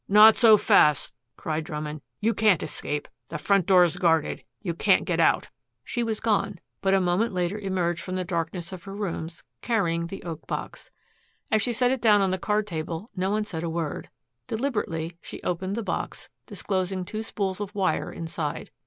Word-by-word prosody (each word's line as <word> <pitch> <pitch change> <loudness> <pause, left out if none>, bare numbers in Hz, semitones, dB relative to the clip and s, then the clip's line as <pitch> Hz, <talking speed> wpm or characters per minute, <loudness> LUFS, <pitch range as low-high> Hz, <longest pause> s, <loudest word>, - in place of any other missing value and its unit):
"Not 210 +2 +8
so 220 -3 +7
fast," 150 -7 +4 0.2
cried 155 0 -2
Drummond. 150 -1 -5 0.2
"You 225 +2 +2
can't 210 -5 +3
escape. 145 0 -3 0.2
The 155 - -4
front 195 +3 +2
door 185 -2 +7
is 175 0 +1
guarded. 165 -4 +1 0.2
You 175 -5 -3
can't 170 - +3
get - - 0
out." - - +3 0.3
She 240 - -3
was 225 -2 -1
gone, 205 -3 0 0.2
but 195 0 +3
a - - +4
moment 185 +5 +1
later 180 +3 -1
emerged 180 -4 -1
from 185 - -5
the 185 -1 -2
darkness 170 0 -3
of 185 0 -9
her 195 0 -7
rooms, 170 -4 -4 0.2
carrying 170 -8 0
the 195 - -8
oak 165 -2 -7
box. - - -5 0.6
As 215 - +3
she 240 - 0
set 245 +1 +2
it 260 -3 -1
down 210 -3 +6
on 195 -2 +2
the 185 - -1
card 210 +2 0
table, 165 +3 -5
no 185 0 0
one 210 +1 0
said 165 -6 -5
a 170 - -2
word. 165 -2 -3 0.4
Deliberately 180 - -2
she - - -8
opened 185 +3 -2
the 230 - -2
box, - - -4 0.2
disclosing 185 -1 -2
two 215 +4 -4
spools 200 -3 -3
of 205 0 -5
wire 195 -2 0
inside. 160 -2 -4
185 Hz, 190 wpm, -26 LUFS, 170-210 Hz, 0.6 s, Not